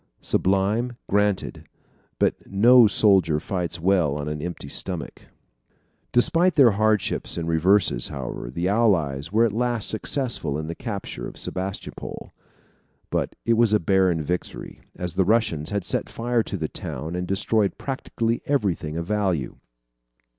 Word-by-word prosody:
Sublime? 105 +6 0
Granted. 105 -1 0 0.5
But - - 0
no 115 +4 +6
soldier 95 -7 +4
fights 90 -1 -3
well 85 -5 +2
on 75 0 -4
an 75 0 -4
empty 85 -4 -6
stomach. 90 +3 -4 0.8
Despite 165 +8 +4
their 135 -6 +6
hardships 105 -1 +1
and 85 -1 -3
reverses, 85 -4 +3
however, - - -6
the 85 +8 -2
Allies 85 -9 +1
were 115 +3 +4
at 110 - -1
last 120 -1 -1
successful 110 - -1
in 80 - -4
the 80 - -4
capture 100 -1 -6
of - - -11
Sebastopol. 95 +1 -5 0.8
But - - -1
it 115 - +3
was 115 -2 +3
a 105 - +4
barren 95 -3 +2
victory, 90 +4 -5
as 90 -2 -4
the 95 - +2
Russians 90 -7 +1
had 100 -3 -2
set - - -2
fire 120 0 0
to 100 - -4
the 80 -3 -2
town 80 +2 -5
and 90 0 -3
destroyed 100 +2 +1
practically 120 -4 -2
everything 95 - -1
of 85 - -3
value. 95 -9 -1
95 Hz, 145 wpm, -24 LUFS, 85-115 Hz, 0.8 s, no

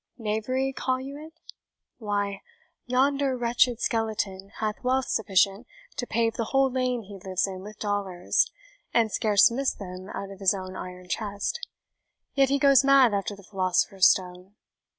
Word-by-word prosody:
Knavery, 250 +5 -1
call 255 -1 -1
you 270 +2 -7
it? 320 +2 -14 0.6
Why, 205 -2 -2 0.5
yonder 270 +1 +2
wretched 240 0 +2
skeleton 205 -4 -2
hath 215 +1 -3
wealth 260 +1 +1
sufficient 200 +1 +1 0.3
to 245 -3 -3
pave 230 0 +1
the 230 - -1
whole 270 +2 +2
lane 250 -2 -1
he 200 0 -11
lives 185 -2 0
in 190 -1 -6
with 210 +2 -10
dollars, 200 -4 0 0.5
and 225 -2 +3
scarce 210 0 +4
miss 270 +3 0
them 185 0 -8
out 195 0 -6
of 195 - -11
his 195 0 +3
own 185 -1 -7
iron 180 0 -8
chest; 205 - -3 0.7
yet 270 -1 +3
he 280 - +2
goes 275 -1 +5
mad 270 -4 +6
after 200 +1 -2
the 200 - -15
philosopher's 190 0 +3
stone. 180 +1 -2
215 Hz, 155 wpm, -26 LUFS, 195-255 Hz, 0.7 s, mad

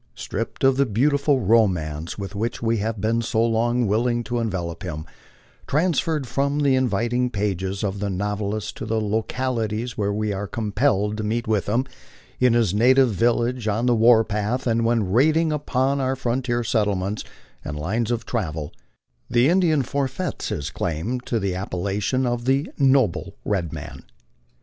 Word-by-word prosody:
Stripped 115 +6 -5
of 135 0 +4
the 140 -1 +3
beautiful 140 +4 +2
romance 90 -8 +1
with 100 -1 -6
which 110 +3 -2
we 115 0 +1
have 110 +1 -2
been 115 +3 +1
so 115 0 +1
long 120 +1 +1
willing 120 +3 +1
to 120 +1 -2
envelop 90 -7 -3
him, 80 -5 -5 0.6
transferred 160 -1 +1
from 140 +4 0
the 140 -2 +3
inviting 125 0 +1
pages 100 -2 -2
of 100 -1 -2
the 100 0 -2
novelist 105 +2 -3
to - - -5
the 110 0 0
lo 110 +1 0
calities 115 -2 -3
where 100 -1 +1
we 105 0 -1
are 100 +1 -4
compelled 105 -1 0
to 110 - -3
meet 115 +2 -1
with 105 -2 0
him, 120 +5 +1 0.5
in 125 -2 +4
his 115 -6 +2
native 125 +3 +5
village, 120 +2 +1
on 110 +3 0
the 125 - +4
war 115 0 +6
path, 105 +5 -2
and 115 -1 +1
when 115 -5 +1
raiding 155 +7 +3
upon 140 -2 0
our 130 0 0
frontier 120 -1 -1
settlements 105 -2 0 0.4
and 75 - -5
lines 105 +9 -1
of 120 -1 -2
travel, 80 -12 -3 0.6
the 120 +4 +4
Indian 165 -5 +3
forfeits 140 +7 -3
his 75 +1 -3
claim 90 +10 -2
to 120 -2 -2
the 100 -2 -1
appellation 100 +7 -1
of 120 -1 -1
the 135 +4 +2
" - - -36
noble 135 -8 +2
red 90 -6 -1
man." - - -8
115 Hz, 170 wpm, -23 LUFS, 100-125 Hz, 0.6 s, war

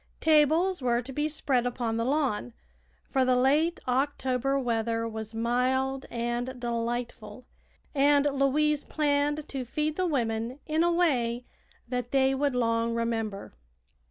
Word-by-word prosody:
Tables 320 +3 +3
were 240 -1 +1
to 265 +2 -8
be 295 +3 0
spread 265 -5 0
upon 235 -2 -2
the 230 - 0
lawn, 255 - 0 0.6
for 265 - +3
the 255 0 +3
late 295 +7 +2
October 265 0 0
weather 230 -2 -1
was 220 0 -6
mild 260 +3 0
and 240 +2 -3
delightful, 235 -1 -4 0.5
and 285 0 +4
Louise 290 +2 +2
planned 295 0 0
to 270 -2 -3
feed 300 +5 -2
the 370 -1 +1
women 235 -4 -1
in 315 +1 +1
a 345 - +3
way 250 -9 +1 0.4
that 250 -1 -3
they 270 0 +3
would 275 -1 0
long 230 -1 +1
remember. 225 -3 -3
255 Hz, 135 wpm, -28 LUFS, 235-290 Hz, 0.6 s, and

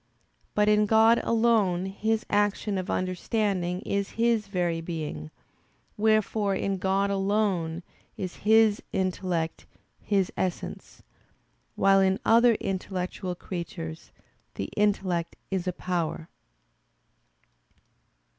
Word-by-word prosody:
But 210 0 +3
in 210 0 +4
God 225 +2 +5
alone 220 -6 +2
His 215 +3 -1
action 205 -1 +1
of 185 - -5
understanding 185 -1 -1
is 200 -1 -2
His 230 -2 +2
very 175 -4 -1
Being. 155 - -5 0.7
Wherefore 215 -1 +2
in 195 0 -1
God 195 +2 +1
alone 195 -4 0 0.3
is 185 -2 -5
His 220 0 +4
intellect 180 -3 -2 0.3
His 195 -3 0
essence: 185 -2 -4 0.7
while 195 0 +4
in 190 0 +2
other 230 +1 +5
intellectual 185 -2 -3
creatures, 165 - -7 0.4
the 100 - -4
intellect 190 -5 0 0.2
is 190 -1 -2
a - - +2
power. 170 -2 -3
195 Hz, 100 wpm, -27 LUFS, 180-210 Hz, 0.7 s, God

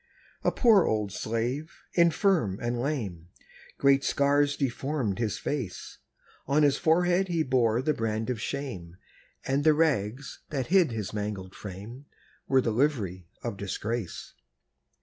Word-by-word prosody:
A - - +3
poor 220 -7 +5
old 105 -2 0
slave, 120 - -3
infirm 170 - +3
and 120 0 -2
lame; 105 - -3 0.5
Great 140 0 +4
scars 145 +1 +2
deformed 135 -5 -1
his 110 -3 -1
face; 120 -11 -5 0.5
On 145 +3 +3
his 145 -2 +4
forehead 175 +3 +2
he 170 -3 +1
bore 125 -3 +2
the 155 - +2
brand 110 0 -2
of 115 -3 -4
shame, 105 -12 -5 0.5
And 135 +2 +1
the 155 0 +5
rags, 135 -5 0
that 135 -4 -2
hid 180 -8 +5
his 110 -3 -4
mangled 105 -3 -4
frame, 105 +8 -9 0.4
Were 135 -1 +4
the 115 - 0
livery 105 - 0 0.2
of 115 -4 -4
disgrace. 105 +1 -4
125 Hz, 135 wpm, -28 LUFS, 105-145 Hz, 0.5 s, poor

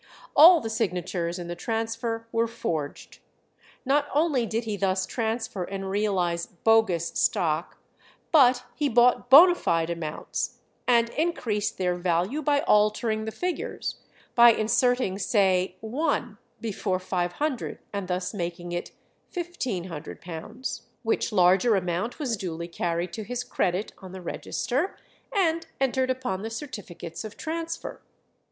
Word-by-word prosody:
All 335 +4 +9
the 225 - -4
signatures 180 -5 -1
in 175 -1 -6
the 175 - -4
transfer 225 +3 -3
were 230 0 +1
forged. 160 -10 -4 0.7
Not 285 +2 +2
only 290 -6 +2
did 225 +2 -1
he 215 -2 -3
thus 190 -1 0
transfer 225 -4 -2
and 195 +1 -5
realize 185 -4 0
"bogus" 190 -3 +2
stock, - - 0 0.5
but 255 -6 +6
he 295 -2 0
bought 245 +1 +4
bonâ 345 +7 +9
fide 165 - 0
amounts, 160 -3 -4 0.3
and 235 -2 +4
increased 235 -10 -1
their 180 -1 +1
value 180 - 0
by 285 -1 +2
altering 215 +1 +2
the 220 - -3
figures, 360 +8 -3 0.4
by 235 -1 +8
inserting 235 -2 +1
say 190 -3 +2
1 240 -2 -1 0.2
before 205 -4 -2
500, 185 - -2 0.2
and 200 -2 -3
thus 180 +2 -2
making 175 -2 -4
it 175 0 -4 0.4
£1500, 210 - -5 0.2
which 225 0 0
larger 190 +3 +4
amount 185 +4 -1
was 255 -8 -1
duly 170 -3 -4
carried 170 0 -2
to 220 - -4
his 245 +3 -3
credit 195 -5 -1
on 185 -2 -10
the 190 - -7
register, 265 - -2 0.3
and 335 -6 +1
entered 260 -1 +1
upon 255 -8 -2
the 220 - -4
certificates 205 - -7
of 215 -1 -8
transfer. 330 +1 -5
220 Hz, 130 wpm, -26 LUFS, 180-250 Hz, 0.7 s, All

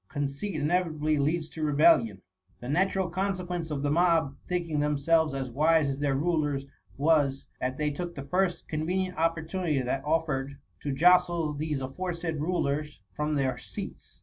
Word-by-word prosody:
Conceit 145 +7 -3
inevitably 155 -1 +1
leads 155 +3 0
to 160 - -8
rebellion. 145 - +4 0.4
The 120 - -8
natural 190 +4 +1
consequence 180 -2 -2
of 145 -2 -3
the 145 - +1
mob 165 -4 +3
thinking 170 -4 -1
them 150 0 +1
selves 160 0 +2
as 130 -2 -3
wise 155 +2 +3
as 135 0 -3
their 145 -2 +1
rulers^ 150 -2 0 0.3
was, 140 -2 +2
that 130 +1 -2
they 150 -1 0
took 175 +3 -5
the 140 - -5
first 180 +4 0
convenient 180 +4 -1
opportunity 165 -1 0
that 130 +1 -2
of 160 +2 +1
fered, 135 -2 -3 0.2
to 145 - -3
jostle 175 +1 +4
these 150 -1 -2
aforesaid 165 +3 -3
rulers 150 -3 -1
from 150 +1 -1
their 135 -2 0
seats. - - -8
155 Hz, 160 wpm, -28 LUFS, 140-170 Hz, 0.4 s, rebellion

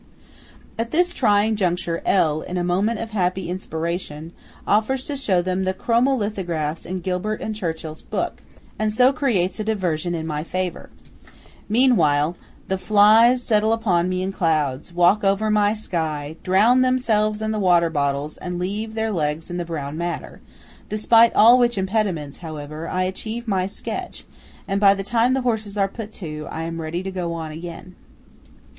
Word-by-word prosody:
At 230 0 -1
this 350 +5 +2
trying 215 -4 +2
juncture, 175 -3 -1
L., 155 -5 +2
in 180 - -5
a 175 - 0
moment 195 +6 0
of 225 0 -5
happy 185 -3 -1
inspiration, 165 -3 -4 0.3
offers 250 +5 +1
to 290 - -4
show 200 -10 +1
them 185 +1 -1
the 185 0 -1
chromo 240 +6 +2
lithographs 175 - -3
in 185 0 -4
Gilbert 185 +4 -2
and 220 - -4
Churchill's 160 -5 -5
book, - - -4 0.4
and 215 0 +1
so 250 +5 +4
creates 200 - 0
a - - -1
diversion 180 -6 -1
in 160 -1 -4
my 150 -1 -3
favour. 185 +1 -4 0.8
Meanwhile 175 - +3 0.3
the 190 -1 -1
flies 220 +5 +5
settle 215 -1 +2
upon 185 -6 +1
me 185 0 -1
in 190 - -2
clouds, 155 -6 -1
walk 175 +4 +3
over 200 +2 +2
my 210 0 +3
sky, 160 -7 -3
drown 215 +7 +4
themselves 220 -5 +1
in 220 0 -2
the 215 - -1
water 175 -3 +3
bottles, 145 0 -1
and 180 -1 -5
leave 210 +5 -3
their 220 0 -1
legs 155 -1 -2
in 175 - -3
the 175 - -3
brown 155 -2 -5
madder; 170 0 -5 0.5
despite 225 +2 +5
all 235 +4 +7
which 240 -2 +2
impediments, 190 -7 -1
however, 155 -1 -7
I 185 0 0
achieve 220 +5 -4
my 190 -3 0
sketch, 195 - -6 0.4
and 195 +1 -1
by 200 -1 +6
the 195 - -4
time 240 +5 +2
the 265 - 0
horses 220 -4 -2
are 195 -1 +2
put 220 +1 -8
to, 155 -4 -6
am 165 +1 -4
ready 165 +3 -4
to 190 - -4
go 175 -3 -3
on 160 -2 -5
again. 170 +3 -8
190 Hz, 170 wpm, -22 LUFS, 170-220 Hz, 0.8 s, all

